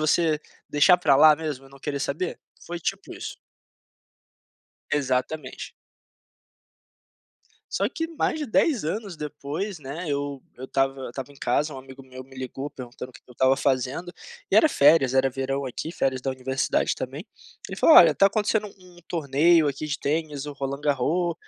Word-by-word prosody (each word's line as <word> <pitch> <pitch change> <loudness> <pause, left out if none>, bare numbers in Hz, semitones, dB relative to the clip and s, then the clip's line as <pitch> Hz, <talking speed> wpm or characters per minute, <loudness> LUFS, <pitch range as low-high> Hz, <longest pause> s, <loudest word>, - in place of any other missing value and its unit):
você 160 -1 +2 0.3
deixar 175 +5 +5
pra 140 -6 +4
lá 155 +2 +8
mesmo 145 -4 -5
e 135 - -19
não 140 - -15
querer 140 0 -4
saber? 160 +6 -3 0.3
Foi 175 0 -5
tipo - - -4
isso. - - -7 1.6
Exatamente. 130 0 -2 2.0
Só - - +1
que 325 -2 -3
mais - - +1
de 300 - -3
10 255 +1 +2
anos 195 +3 -3
depois, 150 +5 -5
né, 145 +6 -6
eu 140 -1 -3 0.2
eu 130 - -7
estava 135 0 0
eu - - -5
estava 135 +3 -7
em 140 - -18
casa, 145 +5 0
um - - -8
amigo 130 0 -12
meu 130 0 -10
me 135 +1 -15
ligou 130 +2 -5
perguntando 125 -1 -9
o - - -37
que - - -15
que - - -29
eu - - -12
estava 130 +2 +3
fazendo, 135 +6 -1 0.4
e - - +6
era 315 - +7
férias, 145 - +4
era 135 0 +3
verão 135 +2 -3
aqui, 130 +5 -5
férias 135 -6 -1
da 135 - -2
universidade 130 0 0
também, - - -6 0.4
ele - - -6
falou: - - +7
"Olha, - - +9
tá 195 - +4
acontecendo 210 +1 +1
um 180 -2 -18
torneio 160 +1 +3
aqui 140 +2 -5
de 140 - -2
tênis, 150 -1 -2
o 145 - -5
Roland 140 0 -4
Garros, 150 +5 +1
140 Hz, 175 wpm, -25 LUFS, 135-165 Hz, 2.0 s, Olha